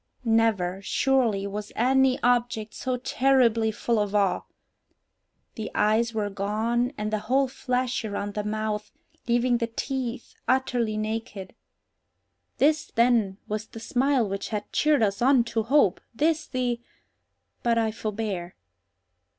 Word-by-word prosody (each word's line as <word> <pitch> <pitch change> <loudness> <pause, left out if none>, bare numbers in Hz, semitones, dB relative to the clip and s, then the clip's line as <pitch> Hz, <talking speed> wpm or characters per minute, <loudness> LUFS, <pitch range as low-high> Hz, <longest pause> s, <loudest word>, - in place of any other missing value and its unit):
Never, 215 -5 +2
surely, 230 -3 +1
was 205 +1 -5
any 265 +2 +3
object 240 -3 +1
so 255 -1 -2
terribly 245 -3 +2
full 225 +1 0
of 205 0 -1
awe! 200 -2 +2 1.1
The 220 - -5
eyes 220 +2 +2
were 210 -2 -2
gone, 220 +5 0
and 215 +1 -3
the 215 - +1
whole 260 +6 +1
flesh 255 -1 -2
around 205 -1 -4
the 210 - -2
mouth, 210 0 -3 0.4
leaving 240 0 +2
the 230 - 0
teeth 245 +1 -4
utterly 245 -4 +1
naked. 215 -3 -4 1.0
This, 300 +2 +3
then, 230 -5 +3
was 215 +1 -3
the 225 - -10
smile 255 0 +1
which 195 0 -4
had 210 -2 -4
cheered 300 -5 +3
us 200 0 0
on 255 -1 +5
to 230 -1 -1
hope! 225 -5 +3
this 315 +4 +1
the—but 240 -1 -4
I 225 -1 +1
forbear. 210 -5 -4
230 Hz, 130 wpm, -26 LUFS, 210-250 Hz, 1.1 s, on